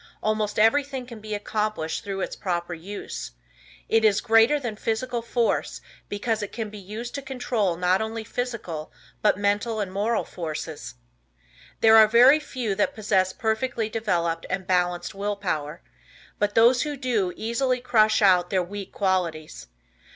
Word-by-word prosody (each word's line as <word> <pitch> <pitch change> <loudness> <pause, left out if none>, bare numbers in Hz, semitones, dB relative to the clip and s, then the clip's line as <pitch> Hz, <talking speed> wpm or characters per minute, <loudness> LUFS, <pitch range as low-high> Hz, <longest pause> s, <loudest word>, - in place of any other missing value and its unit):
Almost 215 -1 0
everything 265 +4 +2
can 235 -3 -10
be 215 0 -5
accomplished 210 -5 -2
through 195 -1 -4
its - - -3
proper 175 -2 -3
use. 175 - -7 0.5
It 225 0 +3
is 210 -2 +4
greater 225 +7 +4
than 240 -6 -4
physical 235 +3 -2
force 235 0 -1 0.3
because 220 +2 -1
it 205 - -5
can 220 -3 -5
be 210 - -9
used 215 +5 -7
to 280 - -4
control 245 -9 -1
not 180 +2 +2
only 220 +1 -4
physical 220 -10 -5 0.3
but 210 - +3
mental 205 +2 0
and 200 -3 -2
moral 215 +4 0
forces. 155 - -6 0.9
There 225 0 +7
are 220 -1 +8
very 250 +7 +7
few 255 -8 -3
that 205 +1 0
possess 195 -3 +1
perfectly 220 +1 -1
developed 170 -7 -1
and 190 0 -2
balanced 180 -1 0
Will 205 +1 -2
Power, 165 -5 -4 0.6
but 205 0 0
those 240 +2 +5
who 295 -1 -3
do 230 -8 0
easily 250 +3 0
crush 220 -4 +3
out 180 -2 +4
their 185 -2 +1
weak 200 +2 -7
qualities. 175 -6 -2
210 Hz, 155 wpm, -25 LUFS, 185-230 Hz, 0.9 s, are